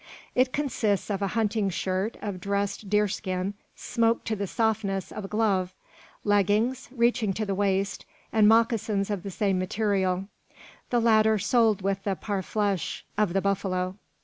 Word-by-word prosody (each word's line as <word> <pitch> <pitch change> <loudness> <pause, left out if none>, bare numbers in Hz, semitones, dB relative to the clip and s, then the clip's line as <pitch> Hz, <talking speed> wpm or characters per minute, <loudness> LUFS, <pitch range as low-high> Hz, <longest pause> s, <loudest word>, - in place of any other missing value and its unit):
It 255 0 +3
consists 225 -9 0
of 200 0 -2
a 200 - +1
hunting 210 -2 +1
shirt 190 +4 -2
of 195 -3 -4
dressed 200 +1 -2
deer 210 +1 +3
skin, 190 -1 -3 0.2
smoked 230 -1 0
to 220 - 0
the 200 -1 -3
softness 205 -3 -1
of 210 - -6
a - - -5
glove; 195 -4 0 0.5
leggings, 210 +5 +1
reaching 235 -4 +1
to 215 +3 -2
the 200 - -1
waist, 195 0 0 0.3
and 215 -2 +5
moccasins 220 -2 +2
of 200 -3 -2
the 200 - -6
same 195 -1 0
material; 190 -1 0 0.6
the 240 - +2
latter 220 -1 +4
soled 215 -1 +2
with 195 0 -1
the 195 -1 0
parfleche 200 -1 -2
of 205 -4 +1
the 195 - +2
buffalo. 185 -2 -1
205 Hz, 155 wpm, -27 LUFS, 195-220 Hz, 0.6 s, and